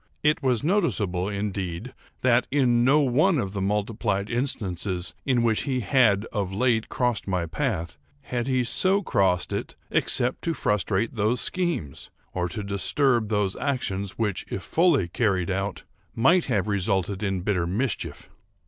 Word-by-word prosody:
It 150 +2 +2
was 130 -4 +1
noticeable, 105 - +1
indeed, 100 0 -4 0.3
that, 125 -1 +3
in 125 -4 +3
no 140 +4 +5
one 150 +7 +3
of 100 -7 -2
the 100 - -3
multiplied 105 0 -1
instances 95 -7 -2
in 125 -3 +2
which 110 -2 +2
he 130 -2 0
had 110 -4 +3
of 100 -4 -2
late 115 +2 +1
crossed 125 -5 -1
my 90 -3 0
path, 85 - -3 0.2
had 125 -2 -3
he 130 -2 +1
so 190 +11 +3
crossed 95 - +1
it - - -4 0.2
except 125 +1 +1
to 165 -1 -1
frustrate 105 -1 0
those 110 +4 +1
schemes, 170 - -2 0.2
or 90 -1 -1
to 105 +5 -5
disturb 110 +4 +1
those 105 -3 0
actions, 100 -9 -2
which, 105 -4 -1
if 95 - -4
fully 160 - +2
carried 95 -2 0
out, 95 +1 -3 0.3
might 165 +10 +4
have 110 -6 0
resulted 100 -1 0
in 95 -3 -1
bitter 90 -3 0
mischief. 110 +7 -2
105 Hz, 150 wpm, -25 LUFS, 95-130 Hz, 0.3 s, no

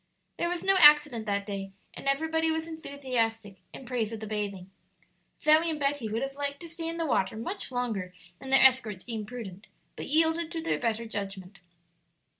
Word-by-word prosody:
There 345 - 0
was 355 -1 -3
no 390 0 +4
accident 295 -7 +7
that 200 -1 -1
day, 195 -1 -5 0.2
and - - -8
everybody 320 +3 +1
was 320 0 -1
enthusiastic 250 -10 -3
in 265 - -10
praise 240 -3 -2
of 225 - -5
the 220 - -6
bathing. 200 -3 -4 0.7
Zoe 310 +2 +5
and 310 -2 -2
Betty 280 -5 -1
would 225 +4 -2
have 270 0 -4
liked 280 0 -4
to 340 - -8
stay 330 0 -5
in 335 - -5
the 330 - -1
water 220 -7 0
much 310 - -4
longer 225 -7 -2 0.3
than 265 - -9
their 270 0 +6
escorts 235 -7 +3
deemed 220 -3 -5
prudent, 215 -5 -8 0.3
but - - -6
yielded 320 +2 +2
to 330 - -3
their 330 - 0
better 230 -1 -1
judgment. 195 -3 -6
250 Hz, 190 wpm, -28 LUFS, 215-315 Hz, 0.7 s, accident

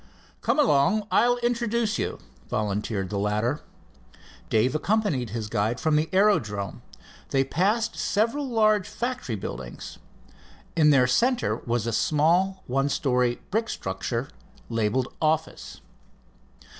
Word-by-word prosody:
"Come - - +1
along, 210 - +3
I'll 245 +1 +4
introduce 235 -2 0
you," - - -2 0.3
volunteered 105 -2 -2
the 100 - -1
latter. 105 +7 0 0.9
Dave 115 +4 +2
accompanied 170 - 0
his 110 0 -4
guide 110 +3 -1
from 155 -1 +1
the 155 +1 +1
aerodrome. 110 - +1 0.5
They 135 -1 +2
passed 210 - 0
several 235 +7 0
large 215 -4 +2
factory 240 - -3
buildings. 65 - -7 0.8
In 155 -2 +5
their 135 -3 +5
center 240 - +2
was 120 -2 -2
a 115 - -2
small 175 - +2
one 135 +3 0
story 125 -6 +1
brick 225 +2 0
structure 115 +8 -3 0.4
labeled 115 +2 0
"Office." 160 0 -1
145 Hz, 120 wpm, -26 LUFS, -, 0.9 s, In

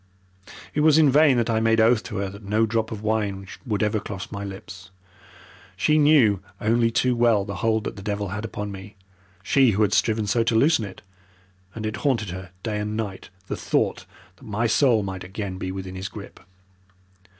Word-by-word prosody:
It - - -1
was 155 0 +5
in 150 -4 +5
vain 145 -2 +5
that 115 - +1
I 110 -1 +1
made 115 0 +2
oath 115 0 +4
to - - -5
her 100 0 -2
that 100 +2 -11
no 105 +3 +2
drop 110 0 -1
of 110 -1 -6
wine 105 -3 -1 0.2
would 105 -1 0
ever 105 0 +1
cross 100 -1 -7
my 100 -1 -5
lips. 95 -1 -9 0.9
She 150 +10 +3
knew 140 -10 +5 0.2
only 115 +2 +2
too 125 +2 +1
well 115 -4 +3
the 100 -1 -5
hold 110 +1 +1
that - - -5
the - - -7
devil 100 -1 -3
had 105 +3 -4
upon 105 -1 -5
me 100 +2 -10 0.5
she 135 +4 +4
who 110 - +4
had 105 0 +1
striven 110 0 +2
so 105 +4 +1
to 115 0 0
loosen 130 -1 +3
it 100 - -11 0.7
and 110 -1 -5
it 110 0 -3
haunted 115 - 0
her 95 0 -7 0.2
night 105 -2 -2
and 105 +1 -3
day 100 -4 -3 0.3
the - - -4
thought - - -1 0.3
that - - -16
my 110 +2 -1
soul 115 -1 +3
might 95 -1 -5
again 95 0 -6
be 95 - -3
within 95 -1 -6
his 95 +1 -5
grip. 100 -2 -10
105 Hz, 205 wpm, -24 LUFS, 100-115 Hz, 0.9 s, was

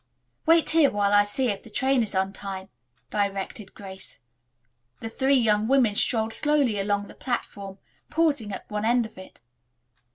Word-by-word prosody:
"Wait 330 0 +4
here 320 -3 +5
while 205 0 0
I 205 0 +6
see 240 +5 0
if 200 - -2
the - - -14
train 265 +4 +1
is 210 -3 -4
on 190 +1 0
time," 195 -1 -7 0.4
directed 200 0 -3
Grace. 190 -1 -10 0.8
The 225 - -5
three 270 +3 +2
young 215 -4 +2
women 255 -5 +3
strolled 220 +1 0
slowly 285 -8 +1
along 205 0 -1
the - - -12
platform, 200 -6 -5 0.3
pausing 300 -9 0
at 190 - -7
one 210 0 -4
end 235 +1 +2
of 220 -3 -12
it. 185 - -13
210 Hz, 165 wpm, -25 LUFS, 200-260 Hz, 0.8 s, I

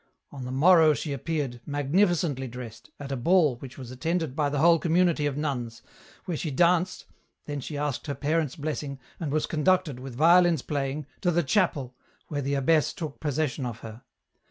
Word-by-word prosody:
On 135 -3 -7
the 125 - -5
morrow 160 +2 +5
she 145 -1 -4
appeared, 140 -4 -3
magnificently 145 -1 +1
dressed, 120 -2 -9
at 140 -1 -7
a - - 0
ball 150 0 +3
which 125 0 -10
was 125 -2 -8
attended 160 +1 -2
by 150 -2 +1
the 145 - -2
whole 165 +3 +5
community 170 -2 +2
of 140 -1 -3
nuns, 125 -6 -3 0.4
where 180 -3 -2
she 155 - -3
danced, 175 +5 +2 0.4
then 145 -1 -4
she 145 +2 -6
asked 145 -1 -3
her 145 - -2
parents* 155 -1 -1
blessing, 145 -2 -4 0.2
and 155 -4 -3
was 155 +1 +1
conducted, 160 -3 +1
with 130 -1 -8
violins 170 +1 +5
playing, 145 0 -3 0.2
to 180 - +2
the 175 0 +2
chapel, 140 -5 0 0.4
where 145 -2 -2
the 140 +1 -1
abbess 155 +3 +2
took 155 -4 -6
possession 150 -2 -1
of 120 -2 -5
her. 110 +1 -9
145 Hz, 180 wpm, -27 LUFS, 135-165 Hz, 0.4 s, morrow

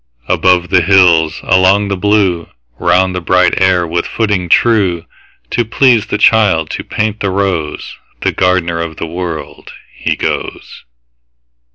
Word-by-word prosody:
Above 90 -1 +1
the 90 - +3
hills, 85 -3 +3
along 95 +2 +2
the 100 - -2
blue, 95 -3 0 0.3
Round 95 0 +1
the 90 - -4
bright 90 +2 +1
air 95 -2 +2
with 85 +1 -3
footing 105 -6 -2
true, 95 -8 +2 0.5
To 120 - 0
please 115 -1 +2
the - - -2
child, 100 -8 +2
to - - -5
paint 105 0 -3
the 100 - -2
rose, 95 -5 -3 0.2
The - - 0
gardener 90 -2 0
of 80 -1 -5
the - - -4
World, 85 -1 -7 0.2
he - - -2
goes. - - -5
90 Hz, 145 wpm, -13 LUFS, 85-100 Hz, 0.5 s, the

